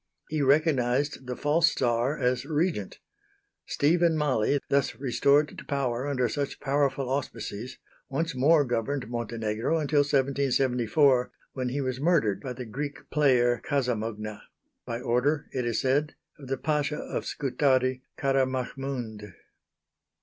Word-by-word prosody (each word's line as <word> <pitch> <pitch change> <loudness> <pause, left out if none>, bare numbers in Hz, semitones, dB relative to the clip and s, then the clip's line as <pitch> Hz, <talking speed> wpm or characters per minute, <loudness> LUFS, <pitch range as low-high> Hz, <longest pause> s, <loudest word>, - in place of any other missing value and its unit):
He 155 -1 -1
recognized 140 -2 +2
the 125 - -3
false 160 +5 +2
Czar 120 +3 +1
as 125 -1 0
Regent. 155 - -1 0.7
Stephen 165 +2 +2
Mali, 140 -2 +1
thus 140 0 +1
restored 140 +3 +2
to - - -9
power 130 -2 -1
under 130 -3 +1
such 140 +1 -3
powerful 140 -1 0
auspices, 125 -3 -4 0.3
once 165 +4 -1
more 145 +4 +4
governed 125 +1 -2
Montenegro 115 +3 -1
until 150 -1 +1
1774, 135 -2 +2 0.2
when 130 -2 -2
he 140 +3 -2
was 130 -1 -3
murdered 145 - +2
by 130 - -5
the 125 0 -7
Greek 140 +6 -6
player 125 -5 +3
Casamugna 110 -6 -2 0.5
by 115 -1 -3
order, 130 +6 +1
it 125 -2 -2
is 115 - 0
said, 145 +4 +1 0.2
of 140 - -10
the 135 +1 -1
Pasha 150 0 -1
of - - -4
Scutari, 130 -2 +1 0.2
Kara 135 -1 +2
Mahmound. 125 -5 -5
135 Hz, 130 wpm, -27 LUFS, 125-145 Hz, 0.7 s, more